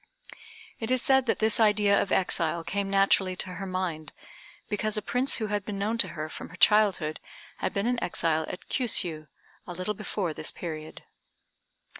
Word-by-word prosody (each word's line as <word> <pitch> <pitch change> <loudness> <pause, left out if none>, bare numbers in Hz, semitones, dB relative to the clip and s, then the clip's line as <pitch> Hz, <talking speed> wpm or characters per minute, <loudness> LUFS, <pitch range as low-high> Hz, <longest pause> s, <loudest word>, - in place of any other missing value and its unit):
It 225 - -4
is 255 0 +3
said 265 0 +3
that - - +2
this 220 +2 +2
idea 210 -2 +4
of 190 - -3
exile 170 -3 +1
came 195 +4 -2
naturally 195 -1 +3
to 185 0 -2
her 195 - -4
mind, 175 -5 -4 0.5
because 215 +1 -1
a - - -1
prince 250 +5 +1
who 220 - 0
had 205 -1 -1
been 205 0 -5
known 215 +4 -1
to - - +7
her 155 0 -3
from - - -8
her 175 - -12
childhood 185 -5 +3 0.4
had - - -2
been 200 +1 -1
an 245 0 0
exile 160 -2 +1
at 180 - -8
Kiûsiû, 170 - 0 0.4
a - - -6
little 185 +4 -3
before 195 -4 -3
this - - -4
period. 155 -2 -7
195 Hz, 180 wpm, -27 LUFS, 170-215 Hz, 0.5 s, to